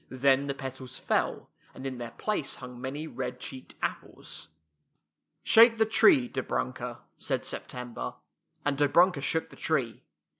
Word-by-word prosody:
Then 135 +1 +3
the 140 - -2
petals 130 -1 -7
fell, - - -1 0.2
and 130 - -8
in 130 -2 -4
their 120 -1 -5
place 210 - -2
hung 125 -1 -10
many 145 +4 -4
red 125 -4 -5
cheeked 130 0 -7
apples. - - -5 0.5
" - - -52 0.3
Shake 230 +1 +7
the 220 - +4
tree, 245 - +5
Dobrunka," 125 - -3 0.2
said - - -1
Sep - - -3
tember, 120 - -6 0.5
and 145 -1 0
Dobrunka 160 +2 +4
shook 160 +4 0
the - - -12
tree. 130 -8 -1
135 Hz, 150 wpm, -29 LUFS, 125-160 Hz, 0.5 s, Shake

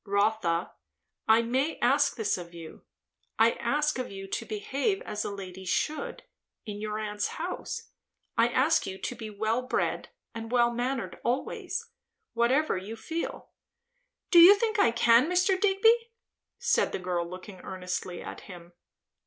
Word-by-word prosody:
"Rotha, 200 -4 +1 0.6
I 225 +1 +5
may 260 +7 0
ask 280 +4 +3
this 220 -4 0
of 175 -1 -9
you. 165 -2 -10 0.6
I 225 +1 +5
ask 295 +4 0
of 250 - -3
you 195 0 -7
to - - -3
behave 275 - -1
as 210 0 -3
a - - -3
lady 190 -2 -8
should, 310 - -2 0.4
in 210 -2 -6
your 215 0 -3
aunt's 210 -1 -2
house. - - -5 0.4
I 230 0 +4
ask 290 +7 +2
you 190 0 -5
to 245 - -4
be 220 -2 -7
well 220 +3 -1
bred 255 - -1 0.2
and 225 0 -7
well 240 -1 +4
mannered 245 +1 -3
always; 245 +3 -2 0.4
whatever 255 +6 +2
you 200 +5 -6
feel." 325 +9 -5 0.8
"Do 345 - +8
you 360 +4 +10
think 435 0 -1
I 235 - +6
can, 235 +4 +4
Mr. 360 +1 +2
Digby?" 450 +4 +4 0.5
said 475 -1 +1
the - - 0
girl 175 -2 -2
looking 185 +1 -9
earnestly 180 -1 -5
at - - -8
him. 175 -2 -12
230 Hz, 155 wpm, -28 LUFS, 200-285 Hz, 0.8 s, you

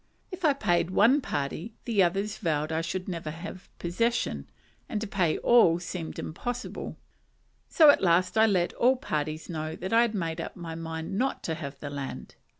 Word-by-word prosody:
If 365 0 -8
I 300 -3 +5
paid 185 -10 +1
one 230 +10 +4
party, 160 - -4
the 225 -5 +2
others 195 +4 0
vowed 155 -4 -1
I 160 0 0
should 180 +3 -4
never 170 -4 -4
have 175 +4 -8
possession, 230 +8 -1 0.4
and 215 - -1
to 220 - -3
pay 185 -6 +1
all 225 -9 +5
seemed 175 -1 -6
impossible; 245 +9 -5 0.7
so 310 -4 +8
at - - 0
last 180 0 +3
I 220 0 +6
let 180 -4 +1
all 255 +2 +4
parties 155 - -3
know 155 -1 -4
that 185 +4 -4
I 230 - +6
had 235 -2 +1
made 165 -3 -2
up - - -6
my 170 -2 -6
mind 165 +3 -4
not 265 +2 -1
to 165 - -2
have 140 -4 -7
the 145 - -6
land. 140 -1 -6
175 Hz, 185 wpm, -28 LUFS, 160-220 Hz, 0.7 s, so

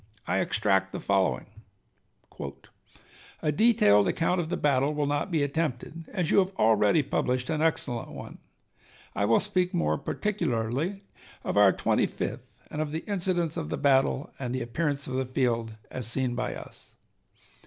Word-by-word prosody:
I - - +1
extract 95 -2 +1
the - - -3
following: 95 -2 +1 2.0
A 150 - +2
detailed 140 - +5
account 175 +2 +1
of 160 - -5
the 180 - -1
battle 140 +1 +2
will 145 -1 0
not 145 +5 -1
be 160 -5 +1
attempted, 155 +2 -2
as 180 -6 -1
you - - +6
have 190 0 0
already 110 - +4
published 130 0 -1
an 155 -1 0
excellent 135 -7 0
one. - - -9 0.8
I 100 - +1
will 115 +2 +4
speak 180 0 0
more 75 - +1
particularly 165 - -2 0.4
of - - -2
our 100 -1 +7
Twenty - - +1
fifth, - - -5 0.2
and 150 - -2
of 155 -1 -2
the 160 +1 -4
incidents 180 -5 -1
of 75 - -3
the - - -2
battle 135 0 +2
and 125 -2 -3
the - - -2
appearance 140 +3 -2
of 130 - -6
the 130 - 0
field 115 -4 -1
as 125 -4 -4
seen 125 +1 -1
by 125 - -2
us. - - -12
140 Hz, 165 wpm, -28 LUFS, 115-165 Hz, 2.0 s, our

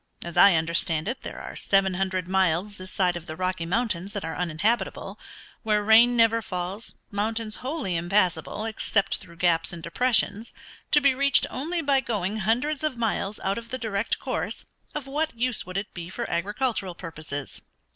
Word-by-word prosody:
As 170 - -6
I 200 -3 +8
understand 160 0 0
it 245 +4 -3
there - - -7
are - - -8
seven 195 -1 +2
hundred 185 -1 -1
miles 190 +2 +1
this 185 0 -8
side 180 -2 +2
of 175 -1 -7
the 155 - -5
Rocky 185 -1 -2
Mountains 200 -2 -1
that 200 -5 -4
are 165 - -4
uninhabitable; 180 +7 -1 0.4
where 210 -2 +1
rain 230 +3 +6
never 230 0 +4
falls; 185 +2 -4 0.2
mountains 215 +1 -1
wholly 260 - -2
impassable, 175 +3 +1
except 210 -2 0
through 175 -4 -14
gaps 170 -2 +2
and 170 -2 -7
depressions, 220 +2 +1 0.4
to 295 - +5
be 280 -1 +5
reached 280 +1 +4
only 330 +6 -1
by 280 -2 +3
going 210 -5 -2
hundreds 250 +9 0
of 305 -5 -1
miles 215 -3 -1
out 195 +3 0
of 230 0 -12
the 255 - -3
direct 220 -3 -1
course.... - - -3 0.3
Of 300 -3 -3
what 300 0 -2
use 245 -5 -1
would 185 +1 -4
it 200 +1 -4
be 170 -1 -6
for - - -4
agricultural 205 0 -1
purposes? 155 -5 -6
200 Hz, 175 wpm, -26 LUFS, 180-235 Hz, 0.4 s, I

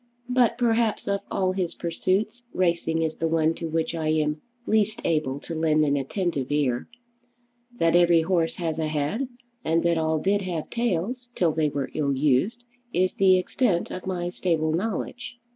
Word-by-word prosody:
But 245 -2 +3
perhaps 230 -2 +1
of 200 0 0
all 185 -2 +1
his 185 -2 -2
pursuits 195 +7 -1
racing 170 -2 +1
is 160 -1 -2
the 165 - 0
one 160 0 +2
to 165 -1 -5
which 160 +1 -1
I 160 -2 -2
am 155 -1 +1 0.2
least 215 0 +1
able 150 -4 0
to 165 - -7
lend 155 -1 +2
an 145 -1 +2
attentive 145 -1 -2
ear. 135 -5 0 0.9
That 165 -3 +3
every 175 -2 +5
horse 165 -1 +1
has 165 -2 -2
a 160 - 0
head, 155 - -1 0.4
and 165 +1 +1
that 170 -1 +2
all 160 0 +1
did 200 +5 +1
have 175 -5 -4
tails 240 +2 -1
till 170 -3 +2
they 155 -1 +1
were 140 -2 -3
ill 140 -2 0
used, 150 - +1 0.3
is 185 -2 +1
the 190 -1 +5
extent 185 -1 0
of 185 0 -6
my 175 -2 -2
stable 165 -3 0
knowledge." 225 +6 -3
170 Hz, 175 wpm, -25 LUFS, 155-195 Hz, 0.9 s, every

